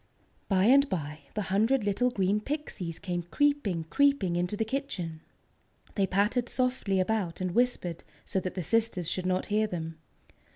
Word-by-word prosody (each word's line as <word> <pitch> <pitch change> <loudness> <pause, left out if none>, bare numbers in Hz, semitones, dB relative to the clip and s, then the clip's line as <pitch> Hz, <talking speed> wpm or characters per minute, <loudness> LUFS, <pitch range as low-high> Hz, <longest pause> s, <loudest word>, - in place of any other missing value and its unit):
By 190 -2 +3
and 275 +5 +6
by, 150 -4 -3 0.2
the 210 - -1
hundred 225 +5 +3
little 205 +5 +2
green 200 -2 +1
Pixies 215 - -4
came 180 -3 -3
creeping, 205 - +1
creeping 245 - +2
into 180 +4 -1
the 220 - 0
kitchen. 195 - -4 0.7
They 195 -2 +1
pattered 210 +6 +1
softly 250 -7 0
about 185 -3 0
and 185 -1 -1
whispered 215 -7 0 0.2
so 190 - 0
that 185 0 -5
the 185 - -2
sisters 225 -3 +1
should 185 +2 -1
not 185 0 +1
hear 215 +1 +3
them. 165 -4 -5
195 Hz, 160 wpm, -29 LUFS, 180-245 Hz, 0.7 s, and